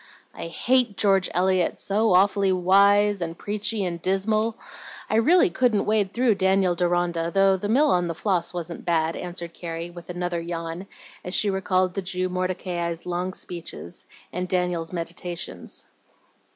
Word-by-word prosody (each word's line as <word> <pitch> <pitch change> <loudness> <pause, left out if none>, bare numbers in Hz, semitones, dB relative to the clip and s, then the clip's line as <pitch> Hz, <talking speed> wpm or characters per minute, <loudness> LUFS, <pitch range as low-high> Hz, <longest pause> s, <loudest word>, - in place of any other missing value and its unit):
"I - - -6
hate 240 +5 +1
George 195 -3 +3
Eliot, 185 -1 +1
so 205 -1 +2
awfully 195 +1 +4
wise 200 +2 +4
and 165 0 -4
preachy 210 0 -2
and 170 -2 -4
dismal! 215 +5 0 0.5
I 215 - +3
really 345 +10 +5
couldn't 240 -5 +2
wade 210 -3 +1
through 240 0 +3
'Daniel 190 -1 +3
Deronda,' 175 -1 0
though 195 +1 +4
'The 205 +2 -4
Mill 285 +6 +4
on 175 -1 +2
the 165 - -3
Floss' 180 -1 0
wasn't 175 -1 -6
bad," 165 -1 +1
answered 175 -1 -6
Carrie, 170 0 -6
with 175 -1 -12
another 175 -1 -2
yawn, 170 +2 -5 0.4
as 180 - -2
she 205 - +2
recalled 185 -1 +1
the 195 - -2
Jew 185 0 -2
Mordecai's 180 -2 -3
long 180 +1 -2
speeches, 170 - -8 0.3
and 180 +1 -2
Daniel's 180 -3 -1
meditations. 170 - -5
185 Hz, 150 wpm, -24 LUFS, 175-200 Hz, 0.5 s, really